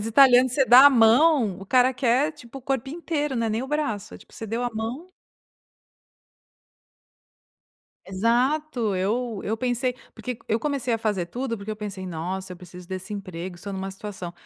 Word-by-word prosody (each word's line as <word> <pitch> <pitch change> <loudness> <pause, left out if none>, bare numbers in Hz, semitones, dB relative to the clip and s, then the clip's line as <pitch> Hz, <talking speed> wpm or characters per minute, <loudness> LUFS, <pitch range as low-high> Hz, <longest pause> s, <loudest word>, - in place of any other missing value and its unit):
Os 210 - -4
italianos, 250 +1 +6
você 270 0 +3
dá 255 +3 +9
a - - +8
mão, 240 - +4
o 195 - -10
cara 255 +3 +4
quer, 260 +5 +1
tipo, 245 0 -12
o - - -17
corpo 265 -1 -2
inteiro. 295 -3 -3
Não 230 -1 0
é - - -1
nem 220 +3 -1
o - - -5
braço, 290 -9 -3
tipo, 215 - -20
você 225 - -7
deu 230 +3 -3
a 245 - -1
mão. 235 +10 -5 3.0
Exato. 240 +3 0
Eu 215 +3 -1
eu 220 - -1
pensei 250 +1 -1 0.2
porque 250 -2 -6
eu 220 - +1
comecei 265 -2 -1
a - - -2
fazer 210 -6 -1
tudo 240 +5 -4
porque 200 +1 -7
eu 215 - -4
pensei: 200 -3 -6
"Nossa, 185 +2 -5
eu - - -9
preciso 180 0 -12
desse 190 +2 -6
emprego, 185 -3 -6
estou 200 +3 -8
numa 190 0 -4
situação" 190 -3 -7
230 Hz, 185 wpm, -24 LUFS, 195-260 Hz, 3.0 s, dá